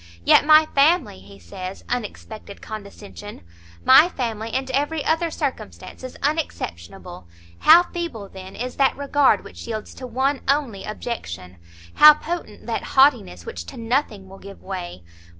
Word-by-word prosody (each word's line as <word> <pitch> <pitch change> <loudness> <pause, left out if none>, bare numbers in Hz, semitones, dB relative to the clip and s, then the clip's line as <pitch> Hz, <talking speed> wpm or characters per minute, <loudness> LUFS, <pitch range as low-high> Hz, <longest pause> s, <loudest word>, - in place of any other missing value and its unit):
Yet 290 - +5
my 310 0 +7
family, 290 - +2
he 100 +1 -15
says, 185 - -9
unexpected 220 -3 -6
condescension! 205 0 -10 0.4
my 335 - +7
family 230 -7 -4
and 265 +1 -3
every 290 +3 -1
other 330 +1 +1
circumstance 260 - -6
is 255 - -8
unexceptionable; 90 - -4 0.3
how 335 +3 +7
feeble, 335 - -6
then, 190 0 -11
is 250 +2 -6
that 270 -1 +2
regard 285 0 +2
which - - -11
yields 220 -2 -6
to 255 - -9
one 265 +3 -1
only 265 -8 -1
objection! 90 - -7 0.4
how 300 0 +9
potent 345 +3 -7
that - - -3 0.2
haughtiness 235 - +3
which 85 - -7
to - - -11
nothing 230 -4 -2
will 195 +1 -13
give 200 0 -13
way! 175 - -7
235 Hz, 145 wpm, -22 LUFS, 195-285 Hz, 0.4 s, how